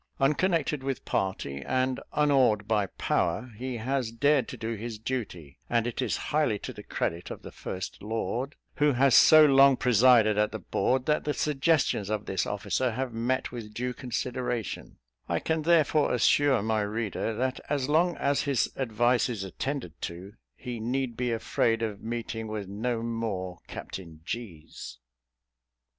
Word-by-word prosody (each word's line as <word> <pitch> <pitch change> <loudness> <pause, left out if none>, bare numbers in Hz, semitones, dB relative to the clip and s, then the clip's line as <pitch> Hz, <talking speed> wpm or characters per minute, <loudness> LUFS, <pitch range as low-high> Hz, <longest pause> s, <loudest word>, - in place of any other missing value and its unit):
Unconnected 150 +1 +1
with 135 -1 -4
party, 70 -8 -2
and 130 - 0
unawed 130 -8 +3
by 105 -3 +1
power, 125 +6 -1
he 125 +2 -4
has 125 0 -1
dared 140 +2 +2
to - - -7
do 115 0 -3
his 115 +1 -5
duty; 105 - -5
and 115 -1 +2
it 120 +2 -3
is 125 - 0
highly 150 -8 +2
to - - -7
the - - -9
credit 85 +1 -3
of - - -8
the - - -9
first 95 0 -6
lord, 115 +6 -3 0.2
who 150 -1 +3
has 130 +1 +4
so 155 +3 +8
long 135 -1 +6
presided 120 -4 +5
at 105 - +2
the 110 - -4
board, 125 +6 0
that 150 0 +1
the 150 - -1
suggestions 145 - +1
of 110 -1 -2
this 95 - -1
officer 115 +5 -1
have 125 +1 -3
met 120 +3 -1
with 110 -3 -8
due 125 +1 -2
consideration; 125 -3 -4 0.3
I - - +1
can 160 0 -1
therefore 155 -3 +3
assure 130 -1 +3
my 110 -1 +1
reader, 110 +1 -2
that 130 +2 -1
as 140 -3 0
long 165 +3 +2
as 140 0 +1
his 135 -6 0
advice 120 0 +1
is 110 -5 -3
attended 95 - -5
to, 90 +4 -6 0.2
he 125 -3 -6
need 125 +2 -2
be 125 +1 -1
afraid 115 0 0
of 105 -3 -3
meeting 115 -1 -4
with 105 -2 -5
no 115 +4 -2
more 105 -6 -3
Captain 85 -4 -8
G 95 -8 -6
's. - - -9
120 Hz, 165 wpm, -28 LUFS, 105-135 Hz, 0.3 s, so